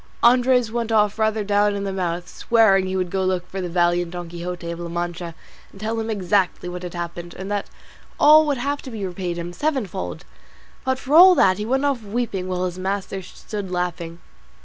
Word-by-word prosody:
Andres 245 Hz, -1 st, +4 dB
went 230 Hz, -1 st, -2 dB
off 210 Hz, 0 st, +2 dB
rather 220 Hz, 0 st, +1 dB
down 205 Hz, 0 st, +2 dB
in 200 Hz, -, -3 dB
the 195 Hz, -1 st, -3 dB
mouth, 175 Hz, -2 st, -2 dB
swearing 195 Hz, -3 st, +3 dB
he 185 Hz, -, -3 dB
would 180 Hz, -2 st, -1 dB
go 190 Hz, -, -1 dB
to 185 Hz, -, +1 dB
look 180 Hz, -1 st, -1 dB
for 190 Hz, +1 st, -5 dB
the 180 Hz, -, -3 dB
valiant 175 Hz, 0 st, +1 dB
Don 175 Hz, -1 st, -7 dB
Quixote 175 Hz, 0 st, -5 dB
of 170 Hz, -, -6 dB
La 170 Hz, 0 st, -5 dB
Mancha 175 Hz, 0 st, -4 dB, 0.4 s
and 195 Hz, -, -15 dB
tell 220 Hz, +2 st, -2 dB
him 225 Hz, 0 st, -3 dB
exactly 190 Hz, -3 st, 0 dB
what 180 Hz, 0 st, -5 dB
had 180 Hz, -1 st, -7 dB
happened, 175 Hz, 0 st, -6 dB
and 190 Hz, +2 st, -6 dB
that 205 Hz, -1 st, -2 dB, 0.5 s
all 305 Hz, +1 st, +7 dB
would 285 Hz, -2 st, +1 dB
have 280 Hz, +4 st, -2 dB
to 265 Hz, -, -9 dB
be 215 Hz, -5 st, -5 dB
repaid 180 Hz, -1 st, -4 dB
him 175 Hz, +1 st, -5 dB
sevenfold; 210 Hz, -, -3 dB, 0.6 s
but 260 Hz, 0 st, 0 dB
for 270 Hz, +2 st, -4 dB
all 365 Hz, +3 st, +9 dB
that, 185 Hz, -, +4 dB
he 210 Hz, -, -3 dB
went 265 Hz, +3 st, +1 dB
off 275 Hz, -4 st, 0 dB
weeping, 205 Hz, -3 st, -3 dB
while 185 Hz, 0 st, -1 dB
his 180 Hz, 0 st, -4 dB
master 195 Hz, 0 st, -3 dB
stood 195 Hz, +2 st, -7 dB
laughing. 175 Hz, -2 st, -3 dB
190 Hz, 215 wpm, -22 LUFS, 175-225 Hz, 0.6 s, all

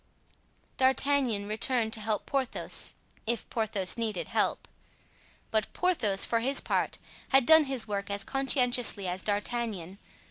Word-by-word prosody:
D'Artagnan 260 Hz, -5 st, +2 dB
returned 220 Hz, +1 st, 0 dB
to -, -, +1 dB
help 210 Hz, -1 st, -2 dB
Porthos, 270 Hz, -3 st, -1 dB, 0.3 s
if 235 Hz, +1 st, -2 dB
Porthos 215 Hz, -3 st, 0 dB
needed 215 Hz, -5 st, -3 dB
help; -, -, -1 dB, 0.8 s
but 220 Hz, -1 st, 0 dB
Porthos, 245 Hz, -, +2 dB
for 230 Hz, -, 0 dB
his 270 Hz, +4 st, +2 dB
part, -, -, -1 dB, 0.3 s
had 270 Hz, -2 st, +4 dB
done 320 Hz, +1 st, +7 dB
his 260 Hz, -5 st, -2 dB
work 200 Hz, -1 st, -4 dB
as 200 Hz, 0 st, -4 dB
conscientiously 250 Hz, -6 st, +1 dB
as 180 Hz, +1 st, -4 dB
D'Artagnan. 205 Hz, -3 st, -3 dB
225 Hz, 130 wpm, -28 LUFS, 205-265 Hz, 0.8 s, done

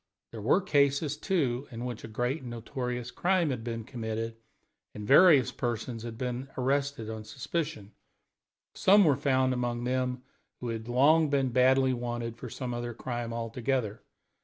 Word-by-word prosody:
There 110 Hz, -, -7 dB
were 130 Hz, -, +3 dB
cases, 140 Hz, -3 st, +2 dB
too, 145 Hz, -7 st, -1 dB
in 120 Hz, 0 st, -6 dB
which, 120 Hz, -3 st, -5 dB
when 115 Hz, -, -9 dB
a -, -, -14 dB
great 125 Hz, +5 st, -1 dB
and 125 Hz, -, -7 dB
notorious 125 Hz, +1 st, -4 dB
crime 180 Hz, -4 st, +1 dB
had 120 Hz, -3 st, -4 dB
been 115 Hz, -1 st, -4 dB
committed, 115 Hz, -2 st, -4 dB, 0.6 s
and 105 Hz, -, -6 dB
various 145 Hz, -3 st, +7 dB
persons 120 Hz, -1 st, -3 dB
had 115 Hz, -1 st, -7 dB
been 125 Hz, +2 st, -3 dB
arrested 135 Hz, -2 st, 0 dB
on 110 Hz, -1 st, -5 dB
suspicion, 115 Hz, -1 st, -4 dB, 0.8 s
some 200 Hz, +1 st, +5 dB
were 145 Hz, -4 st, +4 dB
found 130 Hz, -2 st, +2 dB
among 120 Hz, -1 st, -2 dB
them 125 Hz, 0 st, -1 dB, 0.4 s
who 125 Hz, -, -4 dB
had 115 Hz, 0 st, -4 dB
long 150 Hz, +5 st, +4 dB
been 135 Hz, -2 st, +1 dB
badly 130 Hz, +1 st, +4 dB
wanted 120 Hz, -1 st, -4 dB
for -, -, -8 dB
some 125 Hz, -2 st, -5 dB
other 120 Hz, -1 st, -4 dB
crime 120 Hz, -1 st, -4 dB
altogether. 115 Hz, -1 st, -2 dB
125 Hz, 160 wpm, -29 LUFS, 115-135 Hz, 0.8 s, various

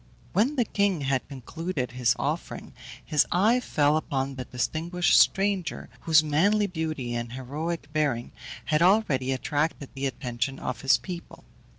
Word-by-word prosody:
When 235 Hz, -, +2 dB
the 245 Hz, -4 st, +2 dB
king 200 Hz, -6 st, 0 dB
had 135 Hz, -1 st, -1 dB
concluded 140 Hz, +1 st, -4 dB
his 125 Hz, 0 st, +1 dB
offering, 150 Hz, +4 st, -4 dB, 0.3 s
his 150 Hz, -2 st, +2 dB
eye 215 Hz, +8 st, +4 dB
fell 150 Hz, -10 st, +2 dB
upon 135 Hz, -3 st, -2 dB
the 130 Hz, -1 st, -6 dB
distinguished 165 Hz, +9 st, 0 dB
stranger, 195 Hz, -2 st, +1 dB
whose 160 Hz, -1 st, +4 dB
manly 195 Hz, +8 st, +2 dB
beauty 160 Hz, -9 st, -3 dB
and 120 Hz, 0 st, -4 dB
heroic 145 Hz, +5 st, -4 dB
bearing 145 Hz, -6 st, 0 dB, 0.3 s
had 155 Hz, +1 st, +1 dB
already 170 Hz, -9 st, +3 dB
attracted 145 Hz, +1 st, -1 dB
the 135 Hz, +1 st, -2 dB
attention 130 Hz, 0 st, -3 dB
of 130 Hz, -, -4 dB
his 135 Hz, -, +4 dB
people. 175 Hz, -2 st, -9 dB
150 Hz, 145 wpm, -26 LUFS, 130-175 Hz, 0.3 s, eye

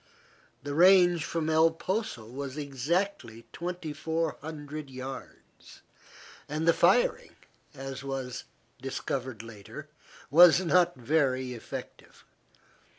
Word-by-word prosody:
The 145 Hz, 0 st, -4 dB
range 175 Hz, 0 st, +6 dB
from 165 Hz, -2 st, -2 dB
El 160 Hz, +1 st, +5 dB
Poso 185 Hz, -, -3 dB
was 130 Hz, +4 st, -7 dB
exactly 140 Hz, -, -2 dB
2,400 155 Hz, -3 st, -4 dB
yards, 130 Hz, +1 st, -10 dB, 0.7 s
and 155 Hz, +2 st, -2 dB
the 170 Hz, -, +7 dB
firing, -, -, +2 dB, 0.4 s
as 135 Hz, 0 st, -7 dB
was 130 Hz, -2 st, -5 dB, 0.4 s
discovered 130 Hz, -3 st, -4 dB
later, 115 Hz, +7 st, -10 dB, 0.4 s
was 170 Hz, +3 st, +8 dB
not 180 Hz, -1 st, +3 dB
very 130 Hz, -1 st, 0 dB
effective. 115 Hz, -, -9 dB
150 Hz, 90 wpm, -29 LUFS, 130-165 Hz, 0.7 s, was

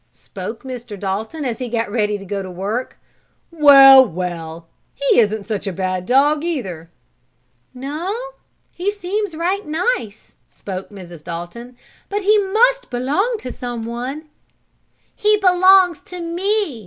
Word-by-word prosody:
spoke 205 Hz, +4 st, -8 dB
Mr. 240 Hz, -5 st, -8 dB
Dalton, 220 Hz, -, -4 dB
as 240 Hz, -1 st, -3 dB
he 250 Hz, -2 st, -4 dB
got 230 Hz, -2 st, -2 dB
ready 210 Hz, -2 st, 0 dB
to 195 Hz, -, -11 dB
go 200 Hz, +1 st, -3 dB
to 190 Hz, -, -7 dB
work. 200 Hz, +8 st, -4 dB, 0.5 s
"Well! 275 Hz, -4 st, +9 dB
Well! 170 Hz, -5 st, -5 dB, 0.3 s
He 280 Hz, -3 st, +2 dB
isn't 215 Hz, -2 st, +1 dB
such 210 Hz, -3 st, -4 dB
a -, -, -1 dB
bad 185 Hz, 0 st, -3 dB
dog, 290 Hz, +4 st, +3 dB
either." 190 Hz, -, -4 dB, 0.8 s
"No, 300 Hz, -, -4 dB, 0.5 s
he 365 Hz, +3 st, -2 dB
seems 410 Hz, -2 st, -3 dB
right 365 Hz, +5 st, -1 dB
nice," 310 Hz, -, -3 dB
spoke 190 Hz, -1 st, -7 dB
Mrs. 175 Hz, -6 st, -11 dB
Dalton. 180 Hz, +10 st, -8 dB, 0.3 s
"But 410 Hz, 0 st, -2 dB
he 420 Hz, +2 st, +4 dB
must 485 Hz, +6 st, +2 dB
belong 290 Hz, -, 0 dB
to 250 Hz, -, -6 dB
someone." 245 Hz, +5 st, -5 dB, 0.9 s
"He 425 Hz, 0 st, +2 dB
belongs 370 Hz, -2 st, +5 dB
to 360 Hz, -, -8 dB
me!" 350 Hz, -, -1 dB
255 Hz, 135 wpm, -19 LUFS, -, 0.9 s, Well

